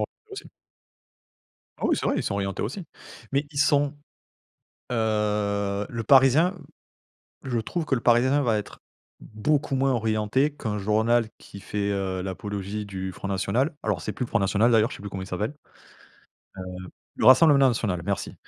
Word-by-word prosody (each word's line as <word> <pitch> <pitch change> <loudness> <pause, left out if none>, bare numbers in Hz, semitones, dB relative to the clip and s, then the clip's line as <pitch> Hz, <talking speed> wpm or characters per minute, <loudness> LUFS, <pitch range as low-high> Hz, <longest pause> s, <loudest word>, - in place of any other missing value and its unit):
orientés 435 -2 -7
aussi. 400 - -7 1.3
Ah, - - -1
oui - - +2
c'est - - -2
vrai, - - +1
ils - - -1
sont 100 - -2
orientés 100 -1 -2
aussi. 155 - -4 0.5
Mais 140 +2 +1
ils 140 - -6
sont, 145 0 +3 1.0
heu, 105 -2 0
Le 115 -2 -4
Parisien, 140 - +5 0.9
je 120 -3 -1
trouve 165 +8 -3
que 135 - +1
Le 120 - -3
Parisien 130 +4 +3
va 115 -4 +1
être 105 - -7 0.4
beaucoup 135 +6 -1
moins 135 0 +2
orienté 115 +4 +1
qu'un 110 -7 -4
journal 110 +3 +2
qui 100 - -12
fait, 100 0 -3
heu, 95 -2 -2
l'apologie 100 +2 -5
du 95 -1 -5
Front 100 - -7
national. 105 - 0
Alors 100 -6 -1
c'est 105 - -4
plus 125 - -3
Front 115 - 0
national 105 +4 +2
d'ailleurs, 115 +2 +3
je - - -6
sais - - -13
plus 100 - -6
comment 95 -1 -5
il - - -9
s'appelle. 105 +8 -3 1.0
Heu, 95 - -6 0.5
le - - 0
Rassemblement 140 0 +7
National 105 -7 -1
merci. 100 +2 -3
110 Hz, 170 wpm, -25 LUFS, 100-135 Hz, 1.3 s, Rassemblement